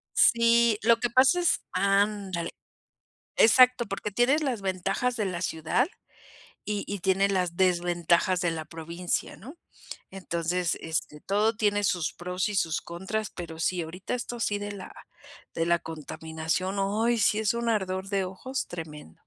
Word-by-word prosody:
Sí, 235 -1 +5
lo 230 0 +5
que 240 - 0
pasa 265 +8 +4
es 345 - +2
Ándale. 195 -2 0 0.9
Exacto, 250 +1 +6
porque 200 +1 -4
tienes 260 +9 +2
las 245 -8 -2
ventajas 195 +6 -1
de 215 - 0
la 180 -3 -3
ciudad 160 - 0 0.8
y 205 -1 -2
y 200 - -2
tiene 190 +2 +2
las 180 -3 0
desventajas 175 0 +2
de 175 -2 +1
la 160 -1 -4
provincia, 170 +3 -4
¿no? 275 - -11 0.5
Entonces, 175 -2 -2
este, 160 -2 -3
todo 210 +2 +1
tiene 205 -1 +1
sus 175 -4 0
pros 180 +3 -3
y 205 - -3
sus 165 -3 +1
contras, 190 +5 -4
pero 165 -2 -8
sí, 175 0 0
ahorita 180 +8 -5
esto 240 -1 -5
sí 205 -2 0
de 205 0 -5
la 195 -2 -9 0.6
de 165 0 0
la 170 0 +3
contaminación, 160 +4 -4
ay, 225 +4 +1
sí 210 0 +3
es 220 +1 +1
un 235 0 -2
ardor 190 -3 -1
de 195 -2 0
ojos 255 +9 -4
tremendo. 150 - -9
190 Hz, 155 wpm, -27 LUFS, 170-220 Hz, 0.9 s, Exacto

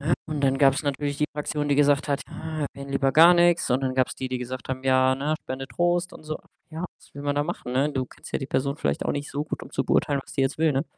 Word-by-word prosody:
Ne, 150 +3 0
und 155 -2 -3
dann 135 -1 +2
gab's 140 +1 +4
natürlich 145 0 -2
die 150 - +2
Fraktion, 150 0 -2
die 145 - +3
gesagt 145 0 +3
hat: 140 0 +1
„Ja, 160 -1 -6
erwähne 140 0 -9
lieber 135 0 +2
gar 165 +5 +8
nix.“ 175 0 +3
und 125 +2 +3
dann 130 -1 -1
gab's 130 -1 +1
die, 130 - -4
die 130 0 -2
gesagt 125 -1 -6
haben 130 0 -3
„Ja, 130 0 +4
ne, 145 +3 -1
spende 130 +1 -5
Trost 175 +1 0
und - - -12
so.“ 155 0 -4 0.3
Ja, 160 +2 -5
was - - -23
will 140 - -7
man 145 0 0
da 145 - +3
machen, 155 -6 -5
ne? 135 +4 +2
Du 130 -2 -1
kennst - - -13
ja - - +1
die 135 - -5
Person 140 +1 -1
vielleicht 70 - -1
auch - - 0
nicht 145 0 -4
so 145 +1 -2
gut, 155 - -5
um - - -10
zu - - -1
beurteilen, 140 -2 +2
was - - -13
die - - 0
jetzt 135 +2 0
will, 160 -1 +3
ne? 135 +2 0
140 Hz, 290 wpm, -25 LUFS, 130-155 Hz, 0.3 s, gar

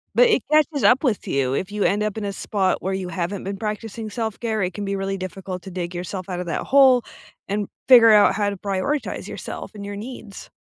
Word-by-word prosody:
but - - +6
it 445 - +3
catches 305 -1 +3
up 260 +5 +5
with 235 -7 0
you. 135 -1 0
If 185 +7 -2
you 210 -1 -1
end 205 +1 +2
up 215 0 -2
in 210 - -3
a 200 - -3
spot 190 -1 -1
where 190 +1 -2
you 185 -2 -3
haven't 185 +2 -3
been 195 +1 -4
practicing 215 +1 -5
self-care, 220 -1 -2
it 180 0 -2
can 205 -1 -5
be 195 0 -2
really 195 0 -2
difficult 185 0 -6
to 190 - -9
dig 175 0 -4
yourself 185 +1 -5
out 180 -1 -3
of 180 - -5
that - - -2
hole 260 -3 +5 0.4
and 205 0 -2 0.2
figure 235 -4 +8
out 210 -1 +6
how 205 -1 0
to 200 - -5
prioritize 205 +10 -2
yourself - - -7
and 200 -1 -7
your 200 0 -6
needs. 220 -2 -9
200 Hz, 230 wpm, -22 LUFS, 190-225 Hz, 0.4 s, figure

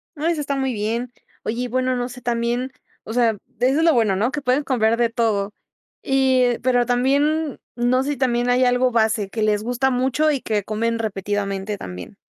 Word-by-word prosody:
No, 305 +2 -2
eso 335 -3 0
está 280 -1 -2
muy 265 -1 -1
bien. 230 +3 -2 0.3
Oye, 235 +3 -2
y - - -2
bueno, 255 +1 0
no 245 0 -2
sé, 250 0 -10
también, 240 +2 -1 0.3
o 220 - -7
sea, 235 -1 +3 0.3
eso 260 +5 +2
es - - +2
lo 330 -1 +5
bueno, 220 -6 +2
¿no?, 220 +7 0
que 295 - -3
pueden 260 +2 +1
comprar 230 -4 +1
de 235 -1 +2
todo. 215 -3 0 0.5
Y, 260 -3 +2
pero 245 -1 +3
también, 280 +4 +1 0.2
no 245 +2 +2
sé 285 - -2
si 290 - -3
también 245 -2 +1
hay 250 +1 +3
algo 250 +1 +2
base 220 -3 +1
que 220 - -4
les 210 -1 +1
gusta 245 +3 0
mucho, 260 +5 +1
y 275 -3 -1
que 210 -2 -1
comen 230 +3 -1
repetidamente 205 -1 -2
también. 90 - -8
245 Hz, 205 wpm, -21 LUFS, 220-260 Hz, 0.5 s, lo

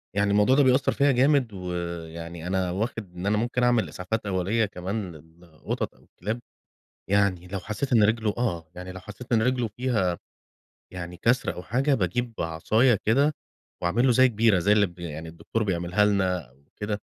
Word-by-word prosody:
يعني 100 0 +2
الموضوع 105 +6 +4
ده 145 - +5
بيأثّر 130 +1 +3
فيا 140 0 +3
جامد، 130 -2 +3
ويعني 85 -2 -5
أنا 95 -1 0
واخد 100 -2 -4
إن 90 +2 -5
أنا 105 +1 +2
ممكن 120 +2 0
أعمل 120 -2 +3
إسعافات 105 +4 -3
أوّليّة 100 +4 +1
كمان 95 0 -4
للقطط 80 +1 -6
أو - - -23
الكلاب، 110 +6 -5 0.7
يعني 100 -3 +2
لو 95 +1 -4
حَسَّيت 105 +9 -4
إن 110 - +6
رجله 110 0 +2
آه، 85 -10 -2
يعني 90 +1 -7
لو 95 - -8
حَسَّيت 105 +6 -11
إن 115 -2 +4
رجلُه 125 0 +1
فيها 105 -6 -1 0.7
يعني 90 -1 -7
كسر 120 +7 +1
أو 90 - -8
حاجة، 135 +7 +1
باجيب 115 +3 -1
عصايا 110 +10 +2
كده، 140 +7 +3 0.5
وأعمل 90 +9 +2
له 130 - +5
زي 130 +2 +6
جبيرة، 110 -4 +3
زي 100 +4 +2
اللي 105 -1 +5
ب 90 -1 -11
يعني 80 -1 -6
الدكتور 95 +7 -3
بيعملها 90 +1 +1
لنا 95 -8 0
أو 65 +3 -28
كده. 105 0 -3
100 Hz, 180 wpm, -26 LUFS, 90-115 Hz, 0.7 s, إن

